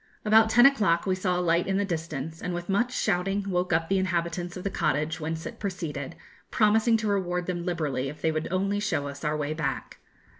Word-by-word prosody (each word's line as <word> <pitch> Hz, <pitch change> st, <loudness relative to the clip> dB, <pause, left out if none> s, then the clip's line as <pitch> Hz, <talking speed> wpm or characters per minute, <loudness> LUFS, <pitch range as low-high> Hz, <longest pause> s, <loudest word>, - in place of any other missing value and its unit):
About 220 Hz, +1 st, +6 dB
ten 240 Hz, +2 st, +6 dB
o'clock 210 Hz, -12 st, +4 dB
we 190 Hz, -, +1 dB
saw 185 Hz, -1 st, 0 dB
a -, -, 0 dB
light 170 Hz, 0 st, +2 dB
in 195 Hz, 0 st, +1 dB
the 205 Hz, -, +1 dB
distance, 160 Hz, -3 st, -4 dB
and 180 Hz, -, -3 dB
with 175 Hz, +1 st, -6 dB
much 235 Hz, +6 st, +1 dB
shouting 195 Hz, -2 st, 0 dB
woke 180 Hz, -1 st, 0 dB
up 165 Hz, 0 st, +2 dB
the 195 Hz, +1 st, +2 dB
inhabitants 175 Hz, -1 st, -2 dB
of 180 Hz, -, -7 dB
the 200 Hz, -, -2 dB
cottage 150 Hz, 0 st, 0 dB
whence 160 Hz, +1 st, -4 dB
it -, -, -7 dB
proceeded, 165 Hz, -8 st, -4 dB, 0.3 s
promising 220 Hz, +1 st, +3 dB
to 215 Hz, -1 st, -2 dB
reward 180 Hz, -3 st, 0 dB
them 175 Hz, -1 st, -3 dB
liberally 145 Hz, -7 st, -1 dB
if 150 Hz, -, -9 dB
they 160 Hz, -, +1 dB
would 155 Hz, 0 st, -2 dB
only 195 Hz, +2 st, 0 dB
show 195 Hz, -9 st, -1 dB
us 140 Hz, +1 st, -8 dB
our 150 Hz, 0 st, 0 dB
way 150 Hz, 0 st, -2 dB
back. 150 Hz, -4 st, -4 dB
175 Hz, 220 wpm, -27 LUFS, 160-195 Hz, 0.3 s, About